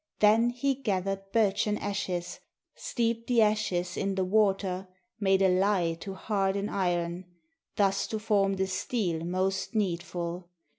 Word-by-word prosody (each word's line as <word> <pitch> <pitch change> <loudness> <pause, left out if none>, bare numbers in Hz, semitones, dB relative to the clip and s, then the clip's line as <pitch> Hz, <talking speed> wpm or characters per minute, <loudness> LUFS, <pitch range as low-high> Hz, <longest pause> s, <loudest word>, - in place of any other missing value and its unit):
Then 220 +3 +5
he 270 +3 0
gathered 195 -5 -2
birchen 210 -1 +2
ashes, 180 -3 -3 0.3
Steeped 230 -1 -2
the 235 -3 +4
ashes 190 -5 0
in 195 -1 -1
the 190 - +1
water, 195 -2 +1 0.3
Made 195 -1 +3
a - - +6
lye 185 -2 +2
to 195 +1 -6
harden 200 0 -1
iron, 175 -1 -1 0.5
Thus 200 -2 +2
to 220 - -3
form 200 -2 +1
the 190 0 0
steel 185 -3 -2
most 185 +5 -1
needful. 175 -3 -2
195 Hz, 135 wpm, -29 LUFS, 185-210 Hz, 0.5 s, a